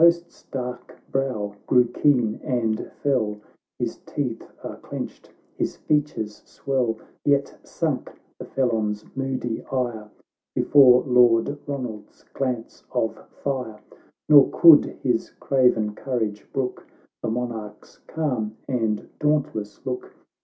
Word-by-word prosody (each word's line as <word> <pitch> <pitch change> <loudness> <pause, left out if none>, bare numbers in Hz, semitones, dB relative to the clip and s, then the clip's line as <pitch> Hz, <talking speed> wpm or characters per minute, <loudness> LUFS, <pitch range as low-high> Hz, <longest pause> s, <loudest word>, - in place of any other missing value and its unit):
C01 - - +7
Their 170 - +10
host's 170 0 -18
dark 125 -2 -5
brow 110 -7 -1
grew 125 -1 +5
keen 120 -4 +2
and 115 -5 -1
fell, 110 -7 +1 0.4
His - - -2
teeth 125 -6 -4
are - - -6
clenched, - - -7 0.3
his - - -2
features 145 -8 -1
swell; 125 -5 -1 0.3
Yet 140 -1 +2
sunk - - -2 0.3
the - - -6
felon's 110 -5 0
moody 130 -3 -2
ire 120 -5 -2 0.5
Before 125 -3 +6
Lord 120 -3 +5 0.2
Eoland's 125 -7 -6
glance 125 -4 -3
of - - 0 0.3
fire, 125 -6 -2 0.5
Nor 145 -3 +8
could 165 -3 +8 0.2
his 125 -4 +1
craven 125 -6 +2
courage 110 -4 -3
brook 130 -2 -3 0.3
The - - -1
Monarch's 115 -3 -5
calm 120 -9 -2
and 115 -5 -1
dauntless 135 -9 -1
look. 125 -1 -5
125 Hz, 115 wpm, -24 LUFS, 110-135 Hz, 0.5 s, Their